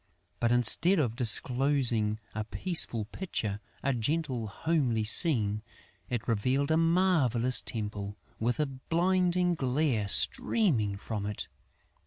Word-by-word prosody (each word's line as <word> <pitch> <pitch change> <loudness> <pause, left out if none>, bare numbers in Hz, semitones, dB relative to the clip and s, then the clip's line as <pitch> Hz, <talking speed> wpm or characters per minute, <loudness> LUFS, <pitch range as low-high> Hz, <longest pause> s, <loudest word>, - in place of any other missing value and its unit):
But, 120 0 -1
instead 125 - +2
of 125 -8 -2
disclosing 120 -2 +2
a 110 - -4
peaceful 120 - +2
picture, 105 - -6 0.2
a 140 - -1
gentle, 125 -1 -3
homely 125 -2 -2
scene, 110 - +5 0.5
it 120 -3 -5
revealed 130 +6 -1
a - - +2
marvellous 165 -8 +2
temple, 105 -2 -7 0.2
with 120 +5 -2
a 150 - +1
blinding 175 +6 -1
glare 130 -6 -2
streaming 110 - +2
from 105 0 -6
it. 105 - -7
125 Hz, 115 wpm, -28 LUFS, 110-160 Hz, 0.5 s, scene